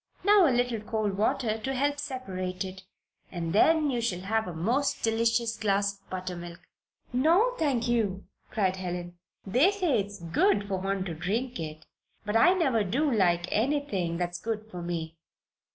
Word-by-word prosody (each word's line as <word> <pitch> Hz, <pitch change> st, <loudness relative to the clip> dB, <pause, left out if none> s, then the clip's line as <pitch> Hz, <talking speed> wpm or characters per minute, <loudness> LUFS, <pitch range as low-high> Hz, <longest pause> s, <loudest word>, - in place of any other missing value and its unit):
Now 405 Hz, -3 st, +6 dB
a -, -, +4 dB
little 245 Hz, -2 st, +1 dB
cold 215 Hz, -2 st, -2 dB
water 220 Hz, +2 st, 0 dB
to 265 Hz, +4 st, -3 dB
help 285 Hz, +3 st, +2 dB
it 285 Hz, -, -11 dB
separate. 190 Hz, -8 st, -5 dB, 0.5 s
And 170 Hz, -2 st, -3 dB
then 305 Hz, +6 st, +4 dB
you 240 Hz, -2 st, -1 dB
shall 185 Hz, -6 st, -1 dB
have 220 Hz, +2 st, 0 dB
a 180 Hz, -, -5 dB
most 240 Hz, -, 0 dB
delicious 230 Hz, 0 st, +1 dB
glass 200 Hz, -1 st, +1 dB
of -, -, -34 dB
buttermilk." 180 Hz, -2 st, -6 dB, 0.5 s
"No, 340 Hz, -, +4 dB
thank 260 Hz, -6 st, +1 dB
you!" 210 Hz, -5 st, 0 dB, 0.2 s
cried 190 Hz, -4 st, 0 dB
Helen. 175 Hz, -1 st, -5 dB, 0.3 s
"They 250 Hz, -, +4 dB
say 360 Hz, -, +1 dB
it's 200 Hz, 0 st, -5 dB
good 200 Hz, -, +1 dB
for 190 Hz, -2 st, -2 dB
one 195 Hz, 0 st, -2 dB
to 175 Hz, -, -4 dB
drink 210 Hz, +9 st, -2 dB
it. 155 Hz, -1 st, -6 dB, 0.4 s
But 210 Hz, 0 st, -2 dB
I 355 Hz, +12 st, +6 dB
never 265 Hz, -, +2 dB
do 270 Hz, +10 st, 0 dB
like 175 Hz, -6 st, +2 dB
anything 215 Hz, -, 0 dB
that's 175 Hz, 0 st, -3 dB
good 220 Hz, -1 st, -4 dB
for 180 Hz, -, -6 dB
me." 165 Hz, -2 st, -4 dB
215 Hz, 170 wpm, -28 LUFS, 185-255 Hz, 0.5 s, Now